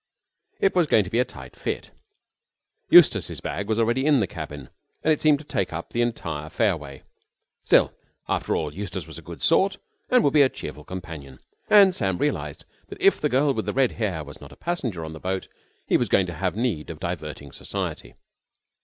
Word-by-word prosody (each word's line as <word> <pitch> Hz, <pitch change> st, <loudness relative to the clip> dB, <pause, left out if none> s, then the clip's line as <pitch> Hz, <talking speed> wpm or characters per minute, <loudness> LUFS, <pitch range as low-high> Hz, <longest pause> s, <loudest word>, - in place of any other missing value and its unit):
It 195 Hz, -, +3 dB
was 175 Hz, -3 st, +3 dB
going 110 Hz, -, +4 dB
to 90 Hz, -, -9 dB
be 115 Hz, -, +1 dB
a -, -, +5 dB
tight 65 Hz, -2 st, -12 dB
fit. -, -, -4 dB, 1.0 s
Eustace's -, -, +6 dB
bag 100 Hz, +1 st, -4 dB
was 110 Hz, -, +1 dB
already 120 Hz, +3 st, +2 dB
in 145 Hz, -3 st, +5 dB
the 105 Hz, -, +2 dB
cabin, 75 Hz, -6 st, -8 dB, 0.3 s
and 155 Hz, -, +4 dB
it 150 Hz, -, -4 dB
seemed 155 Hz, -2 st, +5 dB
to 150 Hz, -, -12 dB
take 95 Hz, -9 st, -2 dB
up 85 Hz, +1 st, -6 dB
the 120 Hz, -, 0 dB
entire 80 Hz, -10 st, -3 dB
fairway. 80 Hz, -, -1 dB, 0.6 s
Still, -, -, +4 dB, 0.3 s
after -, -, 0 dB
all, 75 Hz, -2 st, -2 dB
Eustace 95 Hz, -1 st, -5 dB
was 80 Hz, 0 st, -9 dB
a -, -, -12 dB
good 85 Hz, +1 st, -8 dB
sort, 195 Hz, +4 st, +3 dB, 0.3 s
and 250 Hz, -1 st, +5 dB
would 140 Hz, -, +2 dB
be 150 Hz, -, +6 dB
a 135 Hz, -, +6 dB
cheerful 75 Hz, -, -8 dB
companion. 80 Hz, -7 st, -8 dB, 0.3 s
And 200 Hz, -3 st, +7 dB
Sam 95 Hz, -, 0 dB
realised 145 Hz, +7 st, -2 dB, 0.2 s
that 400 Hz, -, -10 dB
if 395 Hz, 0 st, +4 dB
that 150 Hz, -, +1 dB
girl 140 Hz, +2 st, +3 dB
with 110 Hz, -, -3 dB
the -, -, -1 dB
red 135 Hz, -2 st, +3 dB
hair 95 Hz, -9 st, -2 dB
was 70 Hz, -1 st, -12 dB
not -, -, -11 dB
a -, -, -13 dB
passenger 120 Hz, -, -3 dB
on 80 Hz, -, -7 dB
the 80 Hz, -, -9 dB
boat 95 Hz, +2 st, -3 dB, 0.4 s
he -, -, +3 dB
was -, -, -1 dB
going 95 Hz, -, +4 dB
to 85 Hz, -, -6 dB
have 90 Hz, +4 st, -2 dB
need 110 Hz, -10 st, -1 dB
of 80 Hz, -2 st, -7 dB
diverting 75 Hz, -5 st, -5 dB
society. -, -, -5 dB
95 Hz, 205 wpm, -25 LUFS, -, 1.0 s, And